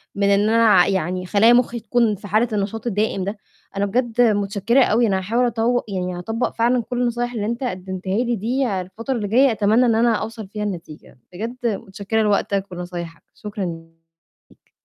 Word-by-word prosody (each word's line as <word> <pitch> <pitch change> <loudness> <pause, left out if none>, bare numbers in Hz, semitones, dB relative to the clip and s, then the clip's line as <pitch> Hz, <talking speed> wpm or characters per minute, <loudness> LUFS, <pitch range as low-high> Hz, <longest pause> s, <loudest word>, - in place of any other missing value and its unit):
من 200 - -1
اللي 205 +1 +2
أنا 230 0 +5
ع 185 -4 +6
يعني 185 -1 -1
خلايا 215 +5 +5
مُخّي 240 -1 +2
تكون 225 -1 +1
في 205 +2 -11
حالة 215 +5 +2
النشاط 210 +3 -2
الدائم 205 -3 0
ده. 200 +2 -4 0.4
أنا 200 - +1
بجد 240 +3 0
متشكّرة 210 +3 +2
أوي، 235 +1 +2
أنا 195 -2 +1
هاحاول 230 +7 0
أطو 240 +1 +1
يعني 180 -2 -3
أطبّق 225 +6 -2
فعلًاً 240 +1 +2
كل 245 +2 -3
النصايح 240 0 -1
اللي 215 -3 -2
أنت 235 +4 -3
قدمتها 185 -2 -3
لي 240 0 0
دي، 230 -2 -1
الفترة 225 +8 -5
اللي 210 -4 -2
جاية 255 +5 +4
أتمنى 220 +3 +3
إن 230 - +3
أنا 230 0 +3
أوصل 220 0 -5
فيها 210 +1 -5
لنتيجة 165 -8 -8
بجد 225 +7 -5
متشكّرة 200 +1 -2
لوقتك 200 -1 +1
ولنصايحك 175 -2 -7
شكرًاً 205 -2 -5 0.9
ليك. - - -27
215 Hz, 180 wpm, -21 LUFS, 195-235 Hz, 0.9 s, ع